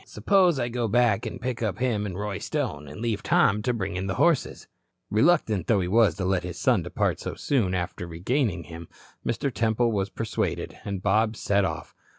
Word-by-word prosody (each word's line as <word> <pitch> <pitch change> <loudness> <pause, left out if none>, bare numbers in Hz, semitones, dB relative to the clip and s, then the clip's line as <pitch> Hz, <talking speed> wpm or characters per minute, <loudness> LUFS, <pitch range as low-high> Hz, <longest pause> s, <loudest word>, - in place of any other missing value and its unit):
Suppose 185 -6 +3
I 120 - 0
go 120 -1 -1
back 115 -2 +2
and - - -6
pick 125 -2 -3
up 105 -5 -1
him 115 -5 0
and 95 -2 -6
Roy 105 -1 -3
Stone, 100 - -3
and 75 +9 -9
leave 115 -3 -1
Tom 105 +1 +3
to 125 - 0
bring 95 -6 -3
in 95 +1 -3
the 95 - -2
horses?" 170 -4 +1 0.4
Reluctant 110 - +2
though 105 - +3
he 90 - -1
was 110 +2 +4
to 95 - -3
let 95 -1 +1
his 90 0 -6
son - - +2
depart - - -1
so - - -5
soon 110 -10 0
after 90 -1 -4
regaining 90 - -1
him, 85 0 -10 0.4
Mr. 125 +3 -1
Temple 115 +1 +1
was 100 -2 -1
persuaded, 110 +1 -3
and 100 -2 -4
Bob 110 +3 +2
set 100 -1 +1
off. - - -5
105 Hz, 200 wpm, -26 LUFS, 95-120 Hz, 0.4 s, was